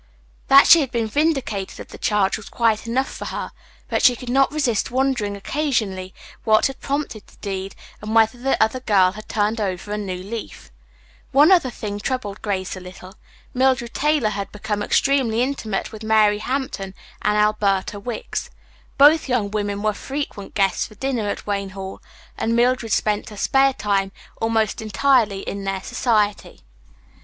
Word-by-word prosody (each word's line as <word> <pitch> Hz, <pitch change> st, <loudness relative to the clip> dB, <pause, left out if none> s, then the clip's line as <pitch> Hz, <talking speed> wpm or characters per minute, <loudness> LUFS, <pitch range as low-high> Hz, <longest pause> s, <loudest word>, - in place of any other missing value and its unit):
That 275 Hz, +1 st, +8 dB
she 335 Hz, -, +8 dB
had 270 Hz, -, -2 dB
been 235 Hz, -2 st, -1 dB
vindicated 250 Hz, -6 st, -1 dB
of -, -, -9 dB
the -, -, -11 dB
charge 205 Hz, -3 st, +1 dB
was 215 Hz, -, -9 dB
quite 230 Hz, -1 st, +1 dB
enough 260 Hz, +3 st, 0 dB
for -, -, -6 dB
her, -, -, -5 dB, 0.4 s
but -, -, 0 dB
she 250 Hz, -2 st, +6 dB
could 245 Hz, +1 st, -6 dB
not 270 Hz, +1 st, +3 dB
resist 275 Hz, -8 st, 0 dB
wondering 245 Hz, -6 st, 0 dB
occasionally 205 Hz, -7 st, -2 dB, 0.3 s
what 215 Hz, -1 st, +4 dB
had 270 Hz, -1 st, -2 dB
prompted 280 Hz, -6 st, -3 dB
the -, -, -21 dB
deed, 195 Hz, -1 st, -5 dB, 0.3 s
and 215 Hz, +1 st, -4 dB
whether 225 Hz, +2 st, +4 dB
the 270 Hz, +2 st, +1 dB
other 220 Hz, +4 st, +2 dB
girl 195 Hz, -7 st, +3 dB
had 215 Hz, +2 st, -11 dB
turned 215 Hz, +1 st, 0 dB
over 190 Hz, 0 st, -3 dB
a 210 Hz, -, -2 dB
new 190 Hz, -3 st, -4 dB
leaf. 210 Hz, +5 st, -8 dB, 0.6 s
One 290 Hz, +6 st, +6 dB
other 345 Hz, -9 st, +5 dB
thing 205 Hz, -3 st, -5 dB
troubled 210 Hz, -4 st, -3 dB
Grace 190 Hz, -3 st, -2 dB
not 185 Hz, -, -9 dB
a -, -, -12 dB
little. 185 Hz, +1 st, -11 dB, 0.4 s
Mildred 255 Hz, -2 st, +1 dB
Taylor 295 Hz, -6 st, +2 dB
had 200 Hz, -1 st, -4 dB
become 210 Hz, 0 st, -3 dB
extremely 245 Hz, 0 st, +2 dB
intimate 230 Hz, -7 st, -3 dB
with 215 Hz, -1 st, -10 dB
Mary 215 Hz, -1 st, +3 dB
Hampton 230 Hz, -6 st, -3 dB, 0.3 s
and 210 Hz, 0 st, +1 dB
Alberta 210 Hz, -2 st, +1 dB
Wicks. 245 Hz, -, -5 dB, 0.5 s
Both 295 Hz, +1 st, +6 dB
young 225 Hz, -5 st, 0 dB
women 205 Hz, -1 st, -2 dB
were 215 Hz, 0 st, +1 dB
frequent 265 Hz, -4 st, -6 dB
guests 195 Hz, -2 st, +1 dB
for 215 Hz, -, -16 dB
dinner 240 Hz, -3 st, -2 dB
at -, -, -5 dB
Wayne 200 Hz, -1 st, -2 dB
Hall, 190 Hz, 0 st, -7 dB, 0.4 s
and 230 Hz, +1 st, 0 dB
Mildred 240 Hz, -1 st, +2 dB
spent 210 Hz, 0 st, 0 dB
her 210 Hz, -, -11 dB
spare 270 Hz, +6 st, +3 dB
time 195 Hz, -4 st, 0 dB, 0.3 s
almost 225 Hz, -2 st, 0 dB
entirely 220 Hz, -1 st, +2 dB
in 200 Hz, 0 st, -5 dB
their 195 Hz, -1 st, -3 dB
society. 210 Hz, -4 st, 0 dB
215 Hz, 170 wpm, -22 LUFS, 200-255 Hz, 0.6 s, That